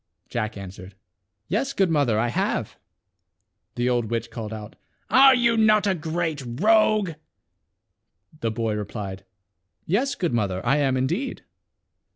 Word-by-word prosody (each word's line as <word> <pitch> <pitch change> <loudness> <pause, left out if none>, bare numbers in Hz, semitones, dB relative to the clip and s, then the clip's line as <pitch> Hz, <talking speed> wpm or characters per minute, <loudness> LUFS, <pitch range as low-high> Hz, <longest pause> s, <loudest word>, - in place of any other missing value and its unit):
Jack 110 -3 -3
answered, 95 0 -10 0.5
"Yes, 265 +8 -1
good 190 -4 +2
mother, 140 -8 +2
I 120 +2 +1
have." 115 - -1 1.0
The 120 0 0
old 120 -2 +1
witch 115 0 -3
called 110 -2 -6
out, 110 0 -8 0.2
" - - -43
Are 270 0 +8
you 235 -2 +3
not 215 -1 +4
a 195 - +2
great 160 -2 -2 0.2
rogue?" 215 -2 +4 1.3
The 115 - -1
boy 110 -1 -2
replied, 100 -2 -5 0.6
"Yes, 260 - 0
good 175 -8 -1
mother, 100 -4 -1
I 135 +4 +3
am, 135 -3 +1
indeed." 170 - -2
130 Hz, 140 wpm, -24 LUFS, -, 1.3 s, Are